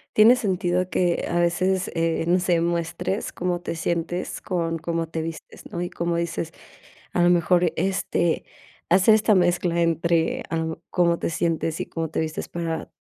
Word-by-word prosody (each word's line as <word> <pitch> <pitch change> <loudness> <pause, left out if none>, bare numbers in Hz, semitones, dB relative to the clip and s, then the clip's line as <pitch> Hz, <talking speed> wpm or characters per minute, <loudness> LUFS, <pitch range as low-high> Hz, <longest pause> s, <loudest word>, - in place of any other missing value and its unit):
Tiene 225 +4 +8
sentido, 185 -4 0
que 175 -2 +1
a 175 - +1
veces, 185 +2 +1
eh, 165 -1 0
no 180 +1 +4
sé, 175 -2 +2
muestres 170 +3 -2
cómo 175 -1 -2
te 170 - -4
sientes, 170 +1 -2
con 165 -3 -1
cómo 165 0 -2
te 160 0 -4
vistes, 165 0 -8
¿no? 175 - -3
Y, 175 - -2
como 170 0 -2
dices, 170 -1 -3 0.6
a 175 - +2
lo 175 - +5
mejor, 175 0 +3
este, 185 -2 0 0.5
hacer 190 +5 +6
esta 215 -1 +3
mezcla 175 -1 +2
entre, 165 0 +1
ah, 160 -1 -2
cómo 170 -2 +2
te - - -1
sientes 165 -1 -1
y - - -2
cómo 165 -2 -3
te - - -2
vistes, 160 0 -3
para 165 -1 -4
170 Hz, 170 wpm, -24 LUFS, 165-180 Hz, 0.6 s, Tiene